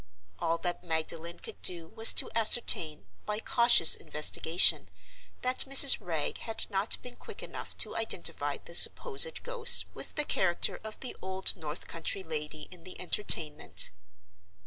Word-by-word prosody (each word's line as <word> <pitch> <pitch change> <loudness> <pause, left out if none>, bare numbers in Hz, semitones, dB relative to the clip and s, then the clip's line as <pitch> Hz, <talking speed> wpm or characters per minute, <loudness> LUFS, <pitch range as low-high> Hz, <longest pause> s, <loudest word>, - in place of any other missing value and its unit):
All 165 0 -4
that 175 0 -7
Magdalen 165 +1 -6
could - - -13
do 170 -2 -3
was 225 0 +5
to - - -1
ascertain, 210 - +2 0.2
by 210 - -5
cautious 235 -8 +3
investigation, 160 +3 +1 0.5
that 255 0 +2
Mrs. 275 0 +9
Wragge 160 -4 -6
had 225 -1 -8
not 195 +2 +1
been 250 -1 -11
quick - - -13
enough - - -10
to - - -2
identify - - -3
the - - -17
supposed 485 0 +3
ghost 485 -1 +5
with - - -9
the 300 - -2
character 175 -9 -2
of 220 0 -11
the 260 - -9
old 190 0 -4
North 155 -2 -9
country 170 +4 -7
lady 150 -1 -7
in 180 -2 -16
the 185 - -13
Entertainment. 150 - 0
180 Hz, 145 wpm, -26 LUFS, 160-235 Hz, 0.5 s, Mrs